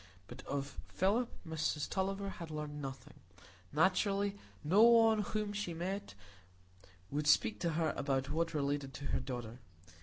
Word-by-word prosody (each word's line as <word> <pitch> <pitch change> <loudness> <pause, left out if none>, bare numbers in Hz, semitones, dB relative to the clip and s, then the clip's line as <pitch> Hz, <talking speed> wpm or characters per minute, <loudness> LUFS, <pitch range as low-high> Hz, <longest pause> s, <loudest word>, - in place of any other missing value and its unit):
But 120 +1 -9
of 140 0 -3
Philip, 215 +6 +1 0.2
Mrs 160 -2 -1
Tulliver 195 +1 -1
had 170 -4 -7
learned 150 -1 -5
nothing; 135 -2 -8 0.5
naturally, 195 +5 +2 0.3
no 180 +8 +4
one 225 -1 +7
whom 210 0 -2
she 200 -5 -3
met 195 +4 -4 1.0
would 145 +1 -1
speak 105 -7 +4
to 170 -2 0
her 160 0 +1
about 135 -1 -1
what 165 +1 0
related 140 -2 -1
to 140 - -7
her - - +2
daughter. 125 -2 -6
160 Hz, 145 wpm, -35 LUFS, 140-195 Hz, 1.0 s, one